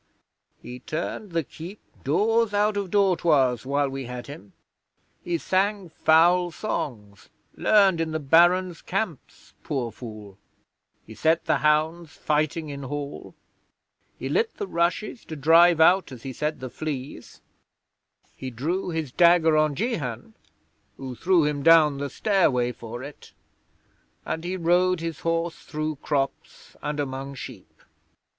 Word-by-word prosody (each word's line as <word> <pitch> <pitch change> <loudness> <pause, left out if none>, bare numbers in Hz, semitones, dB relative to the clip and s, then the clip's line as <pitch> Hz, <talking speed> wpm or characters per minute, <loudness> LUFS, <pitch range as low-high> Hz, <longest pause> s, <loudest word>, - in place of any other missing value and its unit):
He 125 +1 -8
turned 165 - -5
the 165 -1 0
keep 175 +8 -10 0.2
doors 220 - +2
out 210 +1 +2
of 200 -2 -2
dortoirs 160 - +2
while 140 +1 +1
we 135 -1 -5
had 125 0 -7
him. 140 - -11 0.7
He 175 -1 -1
sang 195 +2 0
foul 175 +3 +4
songs, 110 - -5 0.3
learned 195 -5 +4
in 165 - -1
the 155 0 -2
Barons' 175 +4 +3
camps 190 -6 -5
poor 125 -5 -3
fool; 110 -4 -10 0.7
he 110 - -11
set 160 +7 +1
the - - +2
hounds 155 +2 +1
fighting 155 +1 -1
in 140 -1 -6
Hall; 140 +1 -6 0.8
he - - -5
lit 455 0 0
the 415 - -3
rushes 195 - -1
to 160 - -7
drive 165 +3 +5
out, 180 0 +4
as 125 -3 -10
he 135 - -6
said, 150 +2 -3
the 130 -2 -6
fleas; 145 -3 -6 1.0
he 130 - -6
drew 160 +11 -3
his 160 -5 -3
dagger 170 0 +5
on 155 -1 +2
Jehan, 135 - -3 0.6
who 130 -1 -6
threw 175 +4 +2
him 150 -1 -1
down 155 -3 +5
the 140 0 -3
stairway 135 - +1
for 120 +1 -8
it; 145 +1 -11 0.9
and 160 - -3
he 180 +2 -3
rode 180 +1 +2
his 165 -2 -5
horse 165 0 -2
through 155 -1 -4
crops 140 -1 -4
and 150 0 -3
among 135 0 -4
sheep. 125 -6 -11
155 Hz, 140 wpm, -25 LUFS, 135-175 Hz, 1.0 s, drive